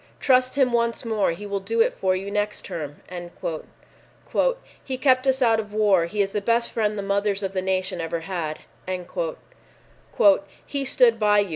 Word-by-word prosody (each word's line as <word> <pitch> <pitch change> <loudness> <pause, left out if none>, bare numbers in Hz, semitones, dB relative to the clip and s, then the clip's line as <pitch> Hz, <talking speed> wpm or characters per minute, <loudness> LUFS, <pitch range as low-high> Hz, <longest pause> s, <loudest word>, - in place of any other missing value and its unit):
"Trust 255 -1 +3
him 265 -3 +3
once 235 0 0
more; 220 -3 +1
he 170 +5 -4
will 200 -1 -2
do 225 +4 -3
it 225 - +4
for 185 -1 0
you 195 +2 -4
next 210 0 -2
term." 150 -3 -6 1.8
"He 260 -2 -4
kept 260 0 +3
us 265 0 +3
out 225 -2 +4
of 210 -1 -6
war. 200 -6 +3
He 205 +3 +1
is 195 - -4
the 210 - -1
best 235 +3 +1
friend 215 -2 0
the 200 - -3
mothers 200 0 0
of 195 0 -2
the 185 - 0
nation 185 -2 -1
ever 165 0 -3
had" 165 -4 -4 2.0
"He 280 -1 -3
stood 235 -3 +4
by 210 -1 +4
you. 200 - -3
210 Hz, 175 wpm, -24 LUFS, 190-235 Hz, 2.0 s, it